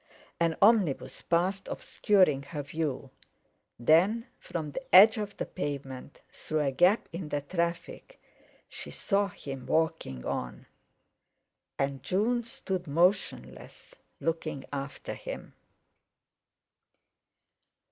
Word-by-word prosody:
An 165 -1 +1
omnibus 190 - +3
passed, 185 +3 0
obscuring 185 -9 +2
her 145 +1 -6
view; 140 -3 -3 0.7
then, 180 - +4
from 155 -3 -5
the - - -4
edge 215 +4 +9
of 205 -1 -5
the - - -2
pavement, 140 -5 -6
through 155 0 -2
a 140 -2 +1
gap 180 - +3
in 170 -2 -5
the 145 -1 -1
traffic, 170 - -3 0.5
she - - -8
saw 200 -1 0
him 135 -8 -8
walking 160 - 0
on. - - -4 1.1
And 135 -1 -1
June 225 - +1
stood 190 -6 -4
motionless, 180 +7 -1 0.3
looking 160 -3 -2
after 135 -1 -5
him. - - -8
165 Hz, 105 wpm, -29 LUFS, 140-195 Hz, 1.1 s, edge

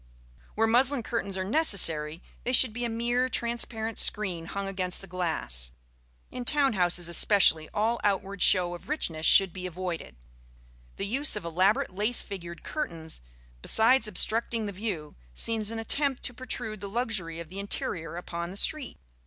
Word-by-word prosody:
Where 225 - +2
muslin 250 +3 +2
curtains 200 -5 -3
are 190 - -2
necessary, 175 - +4 0.2
they 250 - -2
should 255 -2 +6
be 240 +2 -4
a - - -2
mere 240 +3 0
transparent 230 -2 -2
screen 185 -6 0
hung 200 +1 -4
against 185 -2 -1
the - - -11
glass. 160 - -1 0.6
In 250 - -6
town 280 -1 +3
houses 175 -2 +2
especially 170 -3 +4
all 225 +3 0
outward 200 -1 -1
show 180 -2 +3
of 175 - -11
richness 165 - -1
should 195 -3 +5
be 185 -1 -6
avoided; 175 - -6 0.8
the 195 - -4
use 265 +7 +3
of 205 -5 -5
elaborate 180 +3 +1
lace 210 +5 -1
figured 170 -4 -9
curtains, 165 - -5 0.4
besides 225 - +5
obstructing 225 +1 -1
the 205 - -4
view, 185 -6 -5 0.2
seems 220 - +1
an 230 - -5
attempt 270 +4 -1
to 250 - -2
protrude 235 -4 -6
the 200 - -6
luxury 200 -8 -3
of 170 -2 -9
the 190 +3 -8
interior 170 -4 -3
upon 170 -1 -6
the 190 - -6
street. 285 +3 0
200 Hz, 160 wpm, -27 LUFS, 175-230 Hz, 0.8 s, should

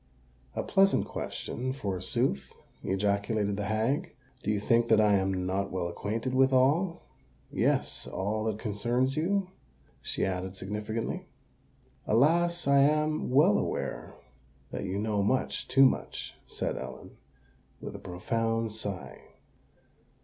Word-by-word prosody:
"A - - -1
pleasant 195 0 +3
question, 130 +2 -4
forsooth!" 95 -8 -1 0.3
ejaculated 100 +1 0
the 105 0 -3
hag. 115 - 0 0.3
"Do 105 - -3
you 105 -1 +2
think 115 +3 +3
that 110 -2 +5
I 105 -1 +5
am 95 -1 +1
not 95 +2 -1
well 90 -2 -1
acquainted 110 +8 -3
with 130 +1 +4
all—yes, 155 +8 0
all 110 +3 -2
that 110 -2 -1
concerns 120 +5 0
you?" 185 +4 0 0.5
she - - -1
added 95 0 -3
significantly. 105 +4 -4 0.8
"Alas! 170 +9 +3
I 140 0 +6
am 150 +2 +2
well 130 -4 +5
aware - - -3 0.6
that - - -4
you 95 +1 -2
know 105 0 0
much—too 130 +4 +3
much," 130 - -1
said - - -3
Ellen, - - -8 0.6
with - - -7
a - - -7
profound 115 +5 -1
sigh. 100 -4 -6
110 Hz, 120 wpm, -29 LUFS, 100-135 Hz, 0.8 s, I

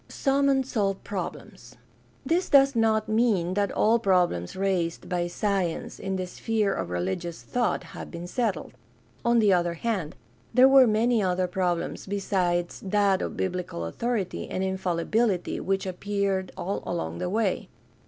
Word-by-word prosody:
Some 275 0 +1
unsolved 235 -8 0
problems. 200 -2 -7 0.3
— - - -33
This 350 +3 +1
does 275 -2 +5
not 220 -1 +2
mean 215 -6 +2
that 200 +1 0
all 225 +2 +3
problems 180 - +1
raised 185 -3 -1
by 175 -1 -1
science 190 -2 -2
in 190 0 -3
the 185 -1 -2
sphere 210 +3 -1
of 95 -2 -3
religious 95 - -3
thought 245 -2 -1
have - - -9
been 170 0 -7
settled. 205 -2 -2 0.5
On 235 0 +3
the 210 -4 +5
other 175 -1 +1
hand, 190 -5 -2 0.4
there 255 +1 +8
were 270 -2 +7
many 225 +1 +2
other 185 -1 +1
problems 180 -1 -2
besides 180 -3 -1
that 200 -1 +2
of - - -4
biblical 180 - -3
authority 215 - -3
and 185 - -2
infalli 190 -3 -1
bility 215 -5 0
which 195 0 -1
appeared 195 0 -2
all 195 +3 -3
along 80 +1 -3
the - - -2
way. 210 -1 -1
195 Hz, 155 wpm, -26 LUFS, 175-225 Hz, 0.5 s, there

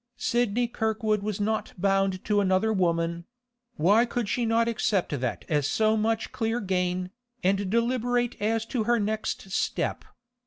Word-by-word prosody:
Sidney 240 -1 +1
Kirkwood 220 -2 0
was 210 -1 -3
not 215 +1 -1
bound 195 0 +1
to 205 -1 +2
another 195 +3 +2
woman; 170 -2 0 0.5
why 200 +9 +4
could 240 -2 -2
she 235 +3 0
not 230 +1 +2
accept 215 -4 0
that 125 -1 -3
as 145 -3 +1
so 215 +4 +2
much 220 +1 0
clear 225 0 -1
gain, 180 -2 -1 0.3
and 195 +1 +1
deliberate 245 +2 +1
as 220 +1 0
to 225 -2 -2
her 240 0 +3
next 210 -2 -3
step? - - -1
215 Hz, 150 wpm, -27 LUFS, 190-230 Hz, 0.5 s, why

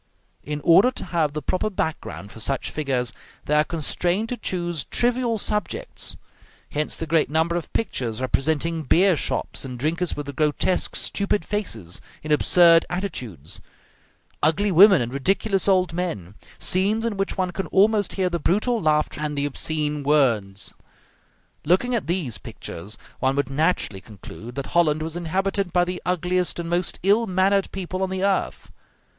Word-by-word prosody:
In 150 0 -4
order 175 - +6
to 255 - -7
have 160 -4 0
the 150 -1 -4
proper 185 +7 0
background 160 - -4
for - - -12
such 135 +4 -1
figures, 130 -5 -1 0.3
they 150 - 0
are 150 0 +5
constrained 175 +6 -1
to 245 - -2
choose 175 -7 -3
trivial 240 -1 0
subjects: 210 -1 -3 0.5
hence 150 +1 -1
the 165 - -4
great 160 0 +2
number 160 +3 +1
of 175 - -4
pictures 120 - -2
representing 160 +5 0
beer 180 +4 +4
shops, - - -2
and 125 -2 -6
drinkers 160 +6 -1
with 140 -2 -5
grotesque, 155 +5 +1
stupid 200 0 -1
faces, 115 - -3 0.2
in 155 - -4
absurd 165 +2 +6
attitudes; 125 - -5 0.8
ugly 195 +7 +2
women 185 - +7
and 120 +2 -5
ridiculous 195 +8 +1
old 185 -3 +3
men; 135 - -3 0.2
scenes 205 +5 +1
in 230 -3 -1
which 195 0 -2
one 185 -1 0
can 190 +2 -4
almost 205 +1 +3
hear 190 -2 0
the 170 -1 -1
brutal 215 +8 +1
laughter 150 -1 +1
and 150 -1 -2
the 140 - 0
obscene 150 +1 -2
words. 115 -10 +1 0.9
Looking 190 +10 +2
at 235 - -1
these 165 - -2
pictures, 100 +6 -8 0.2
one 130 +1 +1
would 140 -1 -1
naturally 145 - 0
conclude 110 +4 -11
that 140 -1 -3
Holland 155 -3 +3
was 160 +1 -4
inhabited 190 +2 -1
by 175 0 +3
the 180 0 -4
ugliest 180 0 0
and 170 -1 -4
most 175 +1 0
ill 210 +4 +3
mannered 190 +1 +2
people 185 -1 -4
on 190 - 0
the 190 0 -2
earth. 200 -1 -1
170 Hz, 160 wpm, -23 LUFS, 145-190 Hz, 0.9 s, women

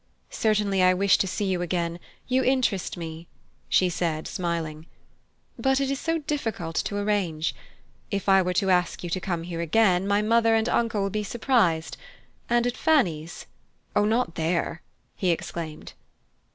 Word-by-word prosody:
"Certainly 210 -3 +1
I 185 0 +5
wish 195 +1 +3
to 195 - +1
see 200 +2 -2
you 185 -2 0
again; 170 -1 -2 0.3
you 260 +1 +2
interest 250 -10 0
me," 165 0 -7 0.4
she 185 - +4
said 165 -3 -2
smiling. 165 -3 -3 0.7
"But 265 0 +2
it 275 -1 0
is 275 - -2
so 330 0 0
difficult 230 - -3
to 205 - -1
arrange. 195 -6 0 0.6
If 200 -2 -3
I 195 -1 +6
were 180 0 -1
to 190 +1 +2
ask 180 -1 +1
you 175 - -5
to 185 - 0
come 175 -3 -3
here 170 -1 -4
again, 185 +1 +3
my 205 +1 +2
mother 225 +1 +3
and 225 +1 +1
uncle 230 -5 +1
would 195 - -2
be 210 0 -1
surprised. 210 -8 +1 0.5
And 240 0 +3
at 245 - -1
Fanny's 175 - +1 0.3
" - - -40
"Oh, 205 - +4
not 225 -3 +1
there!" 170 +1 -1 0.3
he 185 - 0
exclaimed. 165 -2 -4
190 Hz, 165 wpm, -26 LUFS, 170-225 Hz, 0.7 s, I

